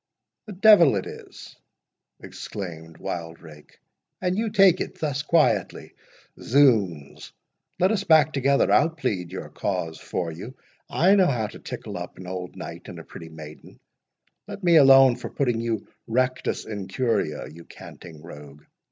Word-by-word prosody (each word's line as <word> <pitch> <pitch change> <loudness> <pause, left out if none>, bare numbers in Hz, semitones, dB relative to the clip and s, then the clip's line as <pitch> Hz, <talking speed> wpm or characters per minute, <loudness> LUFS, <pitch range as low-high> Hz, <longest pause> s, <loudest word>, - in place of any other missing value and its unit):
"The 210 - -7
devil 185 - +6
it 95 - -2
is," - - -11 0.7
exclaimed 80 -5 -8
Wildrake, 80 -3 -9 0.4
"and 180 0 -1
you 220 +2 -1
take 195 -4 +4
it - - -5
thus 145 -2 -2
quietly!— 160 +1 0 0.5
Zounds! 110 - +1 0.5
let 185 +3 +2
us 205 -3 -1
back 155 -3 +4
together—I'll 140 +3 +3
plead 110 - -4
your 95 - -7
cause 80 -1 -4
for 85 -2 -4
you—I 130 - -2
know 190 -3 +4
how 120 -7 -1
to - - -9
tickle - - -7
up - - -9
an 95 - -10
old 90 -1 -6
knight - - -9
and - - -9
a - - -9
pretty 80 - -11
maiden—Let 80 - -14
me 170 -2 +5
alone 135 -3 +7
for - - -7
putting 120 -5 -1
you 115 -3 -3 0.2
rectus 130 +2 -1
in 100 -3 -6
curia, 95 - -2
you 80 +3 -13
canting 80 -3 -13
rogue. 75 -3 -12
115 Hz, 145 wpm, -24 LUFS, -, 0.7 s, alone